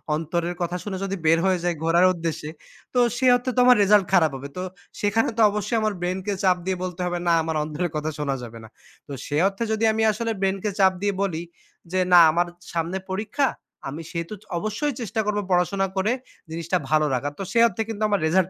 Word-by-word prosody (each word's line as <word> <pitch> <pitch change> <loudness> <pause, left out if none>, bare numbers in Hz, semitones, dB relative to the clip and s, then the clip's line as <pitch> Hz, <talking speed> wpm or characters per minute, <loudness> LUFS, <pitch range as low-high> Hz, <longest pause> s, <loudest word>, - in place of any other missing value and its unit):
অন্তরের 170 +2 -2
কথা 175 +1 -1
শুনে 195 -2 -4
যদি 195 0 -2
বের 165 +1 +5
হয়ে 185 -2 +2
যাই 175 -1 0
ঘোরার 170 +2 +4
উদ্দেশ্যে, 165 -3 -4 0.4
তো 250 - +2 0.2
সে 260 - 0
অর্থে 245 +1 -2
তো 250 - +2
আমার 250 -1 +7
result 205 -1 +5
খারাপ 160 -5 +5
হবে। 135 +1 -7
তো - - -2 0.4
সেখানে 205 +2 +1
তো - - +3
অবশ্যই 210 +3 -1
আমার 215 -1 0
brain 180 +1 -1
কে 205 - -1
চাপ 180 -1 +4
দিয়ে 190 -1 -1
বলতে 180 0 -5
হবে 175 0 -2
না 170 - +4
আমার 160 0 -2
অন্তরের 155 +3 -3
কথা 150 +1 -1
শোনা 140 -2 -1
যাবে 115 -1 -9
না। - - -11 0.4
তো - - -10
সে 145 - -3
অর্থে 195 +4 -3
যদি 220 +1 -1
আমি 220 - -1
আসলে 230 +2 -2
brain 195 0 +1
কে 210 - 0
চাপ 190 -1 +5
দিয়ে 205 -1 +1
বলি 170 -5 -1 0.5
যে, 185 - +1
না 175 - +10
আমার 175 +2 +1 0.3
সামনে 170 +3 -1
পরীক্ষা, 220 +8 0 0.4
আমি 150 +4 -6
সেহেতু 170 +3 -4 0.2
অবশ্যই 215 - -2
চেষ্টা 220 0 -3
করবো 210 0 0
পড়াশোনা 185 +2 +2
করে 200 +4 +2 0.4
জিনিসটা 170 +2 -1
ভালো 155 0 +3
রাখার। 145 +3 -2
তো 195 - -2
সেই 230 0 +5
অর্থে 225 0 -4
কিন্তু 215 -1 -3
আমার 205 - +2
result 185 +2 +2
185 Hz, 215 wpm, -24 LUFS, 165-210 Hz, 0.5 s, না